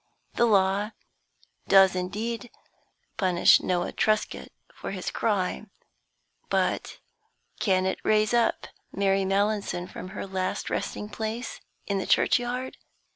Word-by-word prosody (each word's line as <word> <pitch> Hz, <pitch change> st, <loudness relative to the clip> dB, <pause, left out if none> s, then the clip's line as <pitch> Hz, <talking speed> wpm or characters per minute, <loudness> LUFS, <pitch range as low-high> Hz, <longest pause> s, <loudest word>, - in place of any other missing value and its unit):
The 235 Hz, -, +3 dB
law 200 Hz, +1 st, +2 dB, 0.7 s
does 195 Hz, -1 st, +6 dB
indeed 220 Hz, +6 st, -3 dB, 0.7 s
punish 180 Hz, -3 st, +5 dB
Noah 175 Hz, -1 st, -1 dB
Truscott 215 Hz, -1 st, 0 dB, 0.3 s
for -, -, -7 dB
his 190 Hz, -2 st, -4 dB
crime, 205 Hz, -1 st, -1 dB, 0.8 s
but -, -, 0 dB, 0.6 s
can 185 Hz, -2 st, +2 dB
it 190 Hz, -, -1 dB
raise 215 Hz, +1 st, +2 dB
up 235 Hz, -1 st, +2 dB, 0.3 s
Mary 195 Hz, 0 st, +1 dB
Mallinson 200 Hz, -2 st, 0 dB
from 185 Hz, -, -8 dB
her 190 Hz, -, -6 dB
last 190 Hz, -1 st, -3 dB
resting 210 Hz, -, -3 dB
place 220 Hz, +3 st, -5 dB, 0.2 s
in 200 Hz, -1 st, -1 dB
the -, -, -4 dB
churchyard? 250 Hz, +1 st, +1 dB
200 Hz, 115 wpm, -27 LUFS, 190-220 Hz, 0.8 s, does